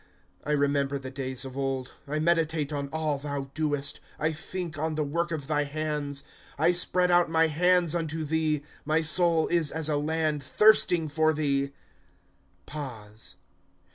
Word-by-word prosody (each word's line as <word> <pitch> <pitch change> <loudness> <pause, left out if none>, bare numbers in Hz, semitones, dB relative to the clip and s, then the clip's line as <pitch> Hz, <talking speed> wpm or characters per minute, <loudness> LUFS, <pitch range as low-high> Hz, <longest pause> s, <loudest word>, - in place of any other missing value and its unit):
* - - -38
I 150 - -1
remember 140 -1 +1
the 130 -1 -7
days 130 -1 -2
of 130 -1 -8
old; 135 -1 -2 0.2
I 150 +2 -2
meditate 160 -2 +1
on 140 -1 -2
all 155 -3 -1
thou 140 -1 -4
doest, 145 -2 -1 0.2
I 155 +1 0
think 175 +1 -5
on 155 +1 -2
the 155 - 0
work 170 +4 -1
of 155 -4 -3
thy 150 0 +1
hands. 145 -1 -3 0.2
* - - -23
I 160 +4 +4
spread 180 0 +2
out 175 -1 +4
my 165 0 +4
hands 175 +1 +3
unto 160 -2 -2
thee; 155 -1 0 0.2
My 160 +2 +1
soul 165 0 +3
is 170 -4 +2
as 160 0 -2
a 150 - +1
land 155 0 0
thirsting 175 +2 +4
for 155 +1 +2
thee. 140 -2 0
155 Hz, 165 wpm, -28 LUFS, 140-160 Hz, 0.2 s, I